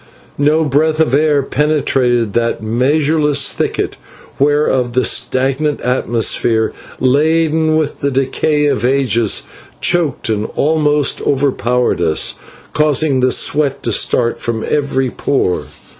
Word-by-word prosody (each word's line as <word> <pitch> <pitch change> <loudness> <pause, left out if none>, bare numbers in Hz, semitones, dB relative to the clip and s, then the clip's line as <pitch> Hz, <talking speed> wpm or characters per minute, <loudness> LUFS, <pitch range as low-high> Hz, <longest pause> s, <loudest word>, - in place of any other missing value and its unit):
No 150 +3 +2
breath 155 +3 +1
of 160 -5 +1
air 145 -1 +2
penetrated 130 -7 0
that 115 -2 -1
measureless 145 +5 +1
thicket, - - -3 0.4
whereof 140 -4 +1
the 130 - +1
stagnant 135 +3 +1
atmosphere, 115 -2 0 0.3
laden 155 +3 +2
with 155 -2 -2
the 140 - -1
decay 140 +3 0
of 140 -4 0
ages, 120 -4 +1 0.4
choked 170 -7 0
and 110 -1 -1
almost 150 -1 +1
overpowered 125 -6 0
us, 80 -2 +1 0.4
causing 150 -2 +2
the 130 0 +2
sweat 140 +2 0
to 115 - -1
start 115 +3 0
from 115 -1 -3
every 135 -3 -1
pore. 135 -10 -1
140 Hz, 115 wpm, -15 LUFS, 125-150 Hz, 0.4 s, No